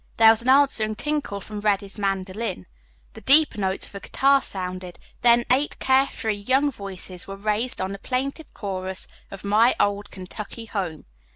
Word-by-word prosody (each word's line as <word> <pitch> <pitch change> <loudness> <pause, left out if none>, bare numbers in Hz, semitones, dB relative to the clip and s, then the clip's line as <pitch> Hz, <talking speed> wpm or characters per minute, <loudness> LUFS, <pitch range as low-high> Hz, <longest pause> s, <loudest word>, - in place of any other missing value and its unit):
There 225 0 +8
was 225 0 +2
an 250 - -1
answering 260 -6 +4
tinkle 295 -7 -2
from 210 +2 -7
Reddy's 205 0 -1
mandolin, 195 - -2 0.5
the - - -11
deeper 295 -5 +6
notes 190 -1 -1
of - - -15
a 200 - -6
guitar 275 +6 +3
sounded, 185 -3 -6 0.2
then 235 0 +5
eight 275 +3 +2
care 265 +1 +3
free 220 -1 -3
young 265 +8 +2
voices 190 -5 -7
were 195 - -6
raised 215 +4 -1
in 190 +1 -2
the 200 - -6
plaintive 275 +6 -3
chorus 190 -2 -4 0.2
of 195 - -10
"My 215 +4 +4
Old 205 0 0
Kentucky 205 +4 -8
Home." 185 -8 -4
210 Hz, 170 wpm, -24 LUFS, 195-255 Hz, 0.5 s, There